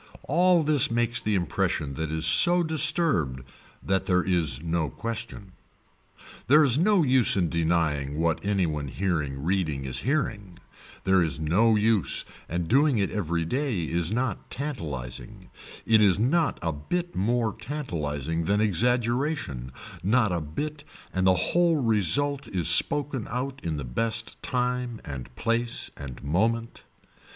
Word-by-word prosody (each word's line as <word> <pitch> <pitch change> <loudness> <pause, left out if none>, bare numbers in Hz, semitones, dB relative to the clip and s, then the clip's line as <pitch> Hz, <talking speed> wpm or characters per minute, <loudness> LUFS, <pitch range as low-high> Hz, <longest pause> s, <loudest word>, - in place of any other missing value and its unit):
All 175 +2 +3
this 150 -3 +4
makes 120 0 +1
the 105 -1 0
impression 75 -5 -1
that 80 +2 -4
is 80 +1 -1
so 170 - +4
disturbed 155 - +1 0.4
that 95 -1 -1
there 90 -1 +2
is 85 -5 +1
no 80 -2 -1
question. 110 - -6 1.0
There 150 +4 +6
is 135 -1 +4
no 195 0 +3
use 130 -6 +4
in 90 -3 +1
denying 80 -4 0
what 85 0 0
any 100 -2 +1
one 75 -3 -3
hearing 75 -5 -2
reading 80 -6 -1
is 65 - -2
hearing, 110 - -2 0.5
there 95 0 +3
is 80 -3 0
no 100 +9 +3
use 110 -2 +1 0.2
and 85 0 -2
doing 140 - +3
it 100 -2 0
every 85 -5 -2
day 125 - -1
is 85 +2 -1
not 120 -2 -2
tantalising, 80 - -6 0.3
it 110 -1 +4
is 100 -3 +5
not 145 +9 +1
a 80 - 0
bit 175 - -4
more 115 +3 0
tantalising 85 - -4
than 100 +3 +1
exaggeration, 120 - 0 0.3
not 110 +1 +2
a 85 -2 -1
bit 145 - -5 0.3
and 95 0 +1
the 95 - +5 0.2
whole 175 -1 +3
result 135 - 0
is 90 -7 0
spoken 140 -5 +3
out 130 +2 -4
in 80 -3 -3
the 70 - -4
best 110 - -2
time 125 -2 -2
and 65 -4 -8
place 115 +1 -1
and 70 -3 -9
moment. 115 +10 -1
105 Hz, 145 wpm, -26 LUFS, 80-125 Hz, 1.0 s, There